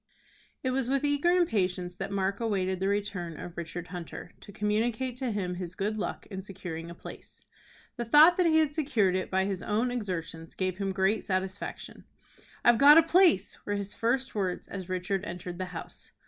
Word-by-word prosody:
It 260 - 0
was 255 -1 0
with 275 +1 +1
eager 290 +3 +2
impatience 190 - +1
that - - -4
Mark 195 0 -1
awaited 190 -5 0
the 190 - 0
return 200 -5 -2
of 175 -1 -8
Richard 170 +1 -6
Hunter, 175 -3 -7
to - - -12
communicate 220 +5 -1
to 255 -1 -2
him 195 -4 -2
his 180 0 -6
good 210 +2 -2
luck - - -4
in 190 -1 -4
securing 180 -4 -7
a 170 - -9
place. - - -11 0.6
The 240 - -2
thought 305 +9 +7
that 360 -2 +4
he 315 -1 +4
had 310 -2 +3
secured 245 - +1
it 185 - -2
by 190 0 +1
his 195 -2 -3
own 225 +4 0
exertions 165 -8 -5
gave 185 0 -2
him 195 -1 -1
great 190 +2 +1
satisfaction. 190 0 -4 0.6
"I've 240 -1 +6
got 290 +3 +9
a 330 - +8
place," 330 - +3
were 205 - -2
his 200 0 -3
first 260 +3 0
words, 190 -4 -2
as 190 -2 -7
Richard 185 +1 -1
entered 175 -1 -6
the 185 - -1
house. 175 -2 -9
200 Hz, 190 wpm, -29 LUFS, 185-240 Hz, 0.6 s, got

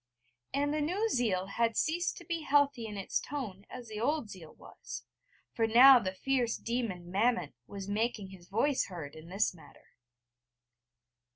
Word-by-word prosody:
And 285 +2 0
the 305 - 0
new 380 +9 0
zeal 215 - +1
had 230 +3 0
ceased 345 +3 0
to - - -11
be 335 -2 -2
healthy 280 -5 +2
in 210 -1 -7
its 195 - -1
tone 215 -9 -6
as 245 - -9
the 215 -1 -6
old 275 -3 0
zeal 165 -5 -11
was: - - -9 0.5
for 225 -1 +1
now 250 +3 +9
the 190 -5 -2
fierce 250 +1 0
demon 215 -8 -3
Mammon 230 +5 +1
was 195 -1 -7
making 210 -1 -1
his 180 -2 -14
voice 255 +7 +1
heard 165 -6 -7
in 160 +1 -12
this 195 +2 +1
matter. 165 - -18
230 Hz, 165 wpm, -31 LUFS, 195-275 Hz, 0.5 s, now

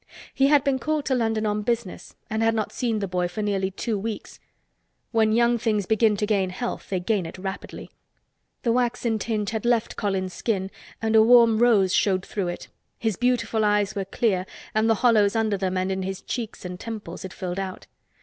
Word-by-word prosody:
He 270 0 +3
had 285 -1 +5
been 270 -2 +1
called 305 +2 -1
to 265 - +1
London 225 -3 0
on 210 0 0
business 230 -3 -3
and 220 +1 -2
had 225 0 +3
not 215 -2 -1
seen 235 -3 -1
the 200 -2 -2
boy 180 -1 0
for 210 +5 -4
nearly 195 -2 0
two 210 +2 -3
weeks. 220 +1 -6 0.7
When 220 -2 +3
young 235 +1 +3
things 215 -3 0
begin 220 0 +3
to 210 - 0
gain 200 -3 +1
health 240 +7 -5
they 190 - 0
gain 185 -1 0
it 165 - -9
rapidly. 190 +1 -7 0.7
The 235 - +2
waxen 240 -2 0
tinge 210 -2 -2
had 220 -2 -3
left, 240 -2 +1
Colins 190 -3 -1
skin 195 -4 -2 0.3
and 220 0 +1
a 220 - +8
warm 230 -1 +6
rose 210 -6 +4
showed 190 -3 +2
through 195 -4 -3
it; 175 - -5 0.3
his 220 -3 -1
beautiful 245 -2 +1
eyes 205 -1 +2
were 200 -2 -3
clear 195 -2 0 0.3
and 220 +1 +2
the 225 - +4
hollows 215 -3 +4
under 220 -2 +1
them 190 -1 -1
and 185 +1 0
in 190 0 -2
his 190 0 -5
cheeks 225 -5 -5
and 180 0 -6
temples 210 -6 -7
had 190 - -7
filled 185 0 -4
out. 190 -1 -5
215 Hz, 205 wpm, -25 LUFS, 190-230 Hz, 0.7 s, a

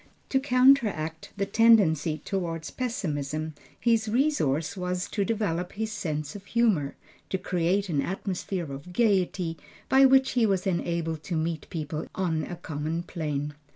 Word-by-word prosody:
To 265 - +3
counteract 245 - +3
the 200 - +1
tendency 195 -8 +4
toward 165 -4 -3
pessimism, 155 - -2 0.3
his 225 -2 +2
resource 210 - +1
was 180 0 -2
to 205 - 0
develop 195 -5 -1
his 220 +1 -3
sense 155 -7 -3
of 200 - -8
humor, 205 -12 +1 0.3
to 190 - 0
create 185 +2 0
an 150 -6 0
atmosphere 185 -3 -3
of 145 +6 -9
gayety, 185 -6 +1 0.3
by 270 +1 +7
which 265 0 +5
he 235 -3 +3
was 190 -2 0
enabled 170 -3 -1
to 175 - -2
meet 160 0 -2
people 155 -2 -4
on 170 -4 0
a 175 - -6
common 160 +1 -3
plane. 150 -4 -3
180 Hz, 145 wpm, -27 LUFS, 160-220 Hz, 0.3 s, by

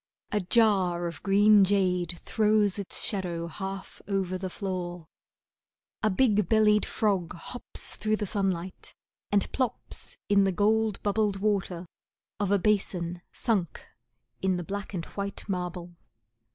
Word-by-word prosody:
A 210 - +1
jar 185 -4 +2
of 170 -3 -5
green 205 +1 +6
jade 180 -3 +1
throws 210 0 +2
its 200 - +4
shadow 175 -5 -1
half 190 +3 -6
over 190 -2 -1
the 185 0 -4
floor. 180 -3 -4 1.0
A 215 - +3
big 210 -3 +2
bellied 210 -1 +4
Frog 195 -6 0
hops 245 +8 -4
through 215 0 +1
the 210 - -3
sunlight 190 -3 -2 0.4
and 205 -1 +1
plops 255 -3 -3
in 200 -1 +4
the 195 - +2
gold 215 +2 +2
bubbled 205 -1 +1
water 195 -4 -1 0.5
of 205 -2 0
a 200 - +4
basin, 180 -3 0
Sunk 200 -8 -1 0.6
in 190 -1 +1
the 175 - -4
black 200 +3 -5
and 170 -2 -3
white 200 0 -5
marble. 180 -2 -4
195 Hz, 135 wpm, -28 LUFS, 180-210 Hz, 1.0 s, green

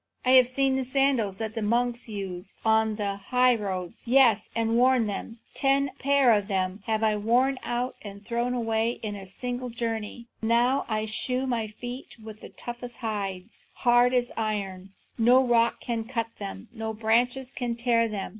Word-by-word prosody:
I 255 - +4
have 255 -1 +7
seen 265 +1 +1
the 265 - 0
sandals 255 -6 +1
that 220 -1 -4
the 225 - -3
monks 240 +2 0
use 195 -3 -6
on 220 0 +3
the 200 -2 -2
highroads, 215 -8 +1
yes, 235 -4 +4
and 230 0 +1
worn 250 -1 +4
them; 210 +3 -5 0.2
ten 275 0 +2
pair 275 -2 +4
of 205 -2 +1
them 190 0 -1
have 220 0 0
I 215 -1 +3
worn 250 +5 +2
out 245 +2 -2
and 200 0 -10
thrown 240 +2 -1
away 225 -1 0
in 210 -1 -3
a 195 -1 -9
single 245 +5 -4
journey. 230 0 -4 0.2
Now 240 +4 +2
I 215 -1 -1
shoe 250 +4 -2
my 235 -4 -1
feet 245 +5 -8
with 215 -1 -10
the - - -10
toughest 240 0 -8
hides, 200 -2 -5
hard 245 0 +4
as 245 -1 +1
iron; 200 -4 -3 0.3
no 245 +3 +6
rock 235 -1 +2
can 230 -2 -2
cut 230 -2 -3
them, 200 +2 -7
no 220 -1 -4
branches 245 +4 +1
can 240 -2 -3
tear 235 -1 +2
them. 205 -3 -4
230 Hz, 175 wpm, -26 LUFS, 215-245 Hz, 0.3 s, have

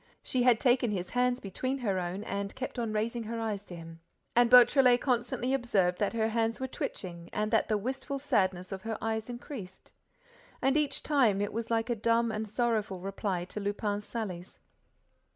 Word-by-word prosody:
She 255 - 0
had 245 -2 +5
taken 245 -1 +3
his 185 -3 -3
hands 250 0 +2
between 255 +7 -3
her 200 -8 -1
own 180 +3 -3
and 200 -1 -4
kept 260 -1 -5
on 230 -2 -1
raising 225 +3 -1
her 230 +1 -4
eyes 215 -3 -2
to 175 - -9
him; 165 -1 -10 0.4
and 240 0 +5
Beautrelet 250 0 +7
constantly 245 0 0
observed 200 -9 +1
that 205 - 0
her 220 -1 +1
hands 225 0 0
were 260 - -2
twitching 170 -8 -5
and 210 0 -1
that - - +3
the 215 - +1
wistful 265 +5 -3
sadness 185 -9 0
of 190 -1 -5
her 225 +1 -3
eyes 220 +1 -2
increased. 240 -6 -8 0.7
And, 270 +1 +2
each 300 -2 0
time, 250 -10 +3
it 205 0 -2
was 230 +1 -3
like 230 +1 0
a - - +1
dumb 230 +1 +2
and 215 0 -3
sorrowful 215 -4 0
reply 190 -1 -3
to 200 - -6
Lupin's 205 0 -2
sallies. 190 -6 -5
220 Hz, 190 wpm, -30 LUFS, 200-245 Hz, 0.7 s, Beautrelet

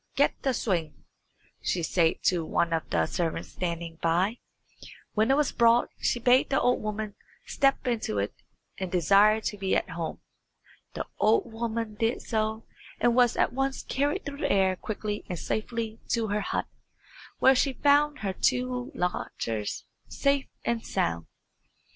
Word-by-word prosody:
"Get 285 - +3
the 270 - +1
swing," 170 -9 -2 0.6
she 175 - -1
said 165 0 +1
to 175 -2 +2
one 170 +1 0
of 160 - -2
the - - +2
servants 165 -2 -2
standing 170 -2 -4
by. 180 +8 +1 0.7
When 220 +2 +2
it 270 - +4
was 300 -2 +2
brought 235 0 +4
she - - +1
bade 250 +2 +4
the 270 - +2
old 250 - +2
woman 215 0 -3 0.3
step 275 0 +1
into 230 - -1
it 100 +1 -1 0.5
and 190 -2 -3
desire 200 +5 +5
to 210 - -3
be 190 -1 +1
at - - -1
home. 165 -2 -4 0.8
The - - -3
old 220 +2 +2
woman 225 -1 -3
did 225 +1 0
so, 220 -1 -1 0.3
and 240 - +3
was 245 -1 +4
at - - +2
once 270 +1 -1
carried 285 +2 -1
through 285 0 -6
the - - 0
air 190 -1 +3
quickly 210 +1 -4
and 180 - -3
safely 225 +3 -3
to 225 -2 0
her 210 +1 0
hut, - - -2 0.7
where 265 - +6
she 270 +1 +1
found 290 +2 +3
her 195 -2 -1
two 250 +3 0
lodgers 115 -11 -3 0.2
safe 280 -1 +1 0.2
and 235 -1 0
sound. 85 0 -1
220 Hz, 160 wpm, -28 LUFS, 180-250 Hz, 0.8 s, where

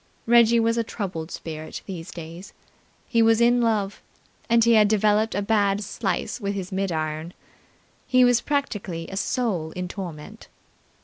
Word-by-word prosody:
Reggie's 235 0 +5
was 230 +1 +1
a - - +1
troubled 185 -8 -5
spirit 155 -3 -7
these 180 -3 -7
days. 170 +2 -9 0.5
He 230 -2 +2
was 225 0 +4
in 240 +1 +4
love, 210 -4 0 0.5
and 230 0 +5
he 235 +1 +5
had 215 -2 +6
developed 215 +1 +2
a 205 - 0
bad 205 -1 +1
slice 230 - -3
with 200 0 -2
his 190 -1 -5
mid 195 0 -1
iron. 155 +1 -3 0.7
He 255 0 +5
was 245 -1 +3
practically 205 - -3
a 195 - -6
soul 200 -5 -1
in 180 0 -4
torment. 175 -6 -8
205 Hz, 160 wpm, -24 LUFS, 180-230 Hz, 0.7 s, had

